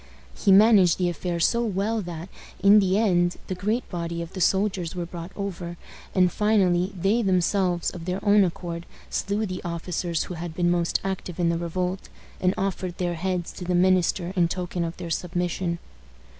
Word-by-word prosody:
He 200 - +2
managed 195 -3 +6
the 180 -1 +1
affair 175 +1 -3
so 235 +7 +2
well 215 +1 0
that, 175 -2 -6 0.3
in 200 +2 +7
the 190 -1 +2
end, 175 -5 +2
the - - -3
great 210 +7 -1
body 170 -1 -3
of 170 - -11
the 185 - -5
soldiers 190 -2 +1
were 175 -1 -3
brought 170 +1 -8
over, 175 -4 -5 0.4
and, 180 -2 +4
finally, 190 -4 +2
they 205 +7 +2
themselves, 185 -2 +1
of 170 -2 -8
their 180 +1 -2
own 205 0 +6
accord, 170 -1 -4 0.2
slew 205 +2 -1
the 185 -2 -5
officers 170 -1 -2
who - - -7
had 170 -1 -6
been 175 -1 +2
most 175 -1 +1
active 190 -2 -4
in 170 -1 +2
the 170 - +1
revolt, 180 +2 -3 0.3
and 185 +1 +1
offered 185 -2 -2
their 175 -1 -1
heads 180 0 -2
to - - -8
the 180 0 0
minister 180 0 +2
in 175 -2 +3
token 175 0 -3
of 165 +1 -4
their 170 -2 -6
submission. 175 0 -1
180 Hz, 185 wpm, -25 LUFS, 175-195 Hz, 0.4 s, in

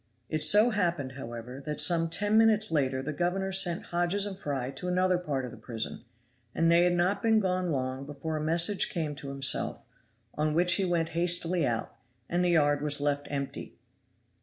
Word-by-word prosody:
It 155 -1 -2
so 215 +4 +6
happened, 170 - -1
however, 125 0 -8
that 150 +1 -3
some 165 -2 +4
ten 205 +5 +1
minutes 220 -1 +4
later 135 -4 0
the 150 +3 -4
governor 180 +5 -2
sent 185 -2 +3
Hodges 175 +4 -1
and 200 -2 -5
Fry 135 -7 -4
to 140 +7 -7
another 180 0 +1
part 140 -7 -3
of 125 - -8
the 120 - -12
prison, 110 0 -5 0.5
and 165 0 +2
they 170 +1 +5
had 180 - +2
not 185 +3 0
been 225 -1 +3
gone 185 -3 -1
long 130 0 -3
before 150 +2 -5
a 155 - -3
message 170 +5 +1
came 155 -4 -3
to 140 -1 -8
himself, 140 0 -1 0.5
on 150 0 -1
which 175 +1 +5
he 195 +1 +2
went 170 -2 -1
hastily 170 -1 +1
out, 115 -2 -3 0.3
and 175 +1 -1
the 180 - +2
yard 145 -4 +2
was 145 -1 +1
left 145 0 -1
empty. 140 -1 -5
165 Hz, 190 wpm, -28 LUFS, 140-180 Hz, 0.5 s, so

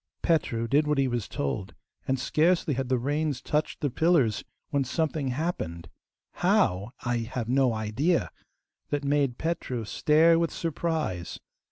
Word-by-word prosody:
Petru 115 -8 +1
did 145 +4 +3
what 150 -1 +1
he 135 -1 +3
was 120 -4 -2
told, 70 -2 -3 0.3
and 135 - +1
scarcely 165 +1 +2
had 130 -1 -2
the 130 - +3
reins 145 +2 -1
touched 150 +1 -2
the 145 - 0
pillars 140 -8 +2 0.3
when 140 -2 +2
something 155 +1 -1
happened 125 - -3 0.5
HOW 125 - +2
I 120 -1 0
have 115 0 -3
no 130 0 +3
idea 115 +11 0 0.6
that 145 -1 -1
made 140 -3 +1
Petru 145 -8 -2
stare 160 +8 +4
with 170 -1 +1
surprise. 160 - -2
140 Hz, 145 wpm, -27 LUFS, 120-160 Hz, 0.6 s, stare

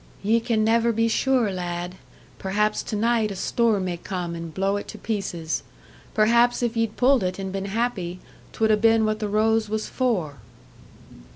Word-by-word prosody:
"Ye 225 +3 +3
can 225 -1 0
never 230 +1 +3
be 225 +1 +1
sure, 245 -2 +2
lad. 175 -1 -4 0.5
Perhaps 210 +2 0
to 215 - -5
night 225 0 +2
a 200 - -5
storm 215 0 +1
may 175 -1 -2
come 175 -1 -4
and 165 -1 -6
blow 195 +4 0
it 205 - -6
to - - -8
pieces. 185 -7 -3 0.5
Perhaps 235 +3 +4
if 235 -1 0
ye'd 225 -2 -1
pulled 260 0 +4
it 185 -1 -2
and 190 -1 -4
been 195 0 -3
happy, 195 -4 -2 0.3
'twould 220 -1 +1
'a 215 - +4
been 225 0 +4
what 215 0 0
the 210 -1 -2
rose 220 +1 +2
was 215 0 -2
for." 185 - -1
215 Hz, 180 wpm, -24 LUFS, 190-230 Hz, 0.5 s, Perhaps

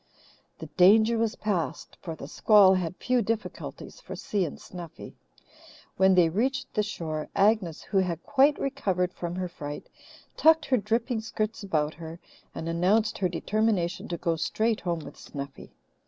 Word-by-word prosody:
The - - -8
danger 220 +5 +5
was 230 0 0
past, 200 -6 -3
for 165 -3 -6
the 140 - -9
squall 200 +3 +5
had 180 -2 -1
few 250 -1 +1
difficulties 225 - -5
for - - -8
Si 200 -3 -1
and 155 - -7
Snuffy. 175 -3 -10 0.8
When 190 0 +4
they 175 -2 +5
reached 265 +10 -1
the 210 - +2
shore, 160 -7 -4
Agnes, 200 -5 +2
who 195 - 0
had 175 -3 -2
quite 285 +1 +3
recovered 190 -10 -1
from 175 0 -5
her 185 0 -2
fright, 145 -4 -8 0.5
tucked 320 0 +5
her 260 - +2
dripping 230 +2 -1
skirts 220 0 -3
about 155 -6 -1
her 165 0 -9 0.4
and 165 - -5
announced 190 +6 +1
her 185 - +1
determination 200 0 -1
to 170 - -3
go 165 -1 -1
straight 220 +7 0
home 170 -2 -2
with - - -11
Snuffy. 140 -1 -8
190 Hz, 160 wpm, -27 LUFS, 170-220 Hz, 0.8 s, danger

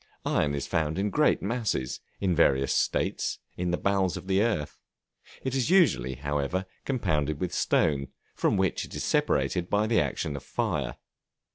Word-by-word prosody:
Iron 70 -1 +1
is 70 - -3
found 80 0 -1
in 100 +1 0
great 150 0 +3
masses, 110 - -1 0.2
in 95 -3 +1
various 70 -5 +3
states, - - 0 0.2
in 90 0 -2
the 90 - +1
bowels 95 -2 +1
of - - -8
the 95 +1 +2
earth; 105 -10 -1 0.6
it 130 - -2
is 135 +1 +1
usually, 145 - +3
however, 70 +7 -2 0.2
compounded 75 - 0
with 90 - -2
stone, 70 -3 +2 0.3
from - - +1
which - - +1
it - - -9
is - - -3
separated 90 -1 +1
by 105 +1 +2
the 110 +1 +3
action 75 - -2
of 70 - -5
fire. - - -2
90 Hz, 165 wpm, -28 LUFS, 70-105 Hz, 0.6 s, great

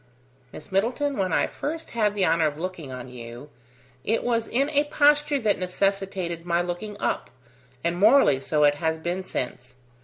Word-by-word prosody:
"Miss 155 - -11
Middleton, 245 +9 0
when 190 -5 -1
I - - +3
first 320 +2 -5
had 210 -3 +1
the 195 -2 +2
honour 165 -1 +3
of 145 -1 -4
looking 170 -5 -5
on 125 -1 -7
you, 120 +3 -10 0.5
it 225 - 0
was 230 -2 0
in 270 +4 +1
a 290 0 +3
posture 295 0 +3
that 210 -3 +1
necessitated 185 -2 -1
my 170 0 +1
looking 180 +4 -4
up, - - -1 0.5
and 170 +1 -1
morally 215 - +5
so 150 +2 +1
it 145 0 +6
has 160 -1 +1
been 175 +3 -3
since. 125 -7 -5
185 Hz, 175 wpm, -25 LUFS, 160-230 Hz, 0.5 s, it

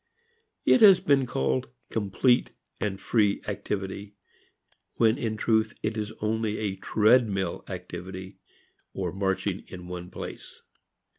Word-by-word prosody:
It 255 - +5
has 195 -4 +9
been 135 -3 +3
called 65 - 0 0.2
complete 110 +4 +2 0.3
and 95 -2 -2
free 105 -4 +2
activity 100 +1 -4 0.8
when 115 +3 +3
in 110 -4 -2
truth 110 -1 +1
it 110 +1 -1
is 105 -1 -3
only 110 0 0
a 100 -3 -2
treadmill 105 -1 +2
activity 95 +1 -7 0.6
or 90 -3 -2
marching 95 0 -1
in 90 -1 -9
one 90 0 -6
place. - - -9
105 Hz, 120 wpm, -27 LUFS, 95-110 Hz, 0.8 s, has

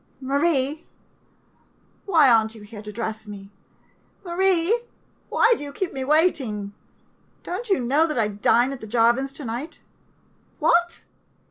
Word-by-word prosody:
] - - -38
Marie 290 0 +1 0.6
— - - -38
why 325 -7 +5
are 230 -3 +5
n't 220 +1 -7
you 215 - -12
here 210 0 -10
to 210 0 -8
dress 220 0 -5
me, 200 -1 -10 0.7
Marie? 370 +4 +2 0.5
Why 460 +1 +4
do 290 - -7
you 285 - -7
keep 360 +5 -4
me 265 - -4
waiting? 265 - +1 0.7
Don't 415 +7 -5
you 390 - +3
know 280 +7 +2
that 305 - -3
I 220 -2 +2
dine 235 +5 +2
at 270 - -9
the 220 - -8
Jarvin's 240 +4 +2
to 285 - -8
night? 240 +7 -6 0.8
What? 345 +2 +1
270 Hz, 155 wpm, -23 LUFS, 220-335 Hz, 0.8 s, why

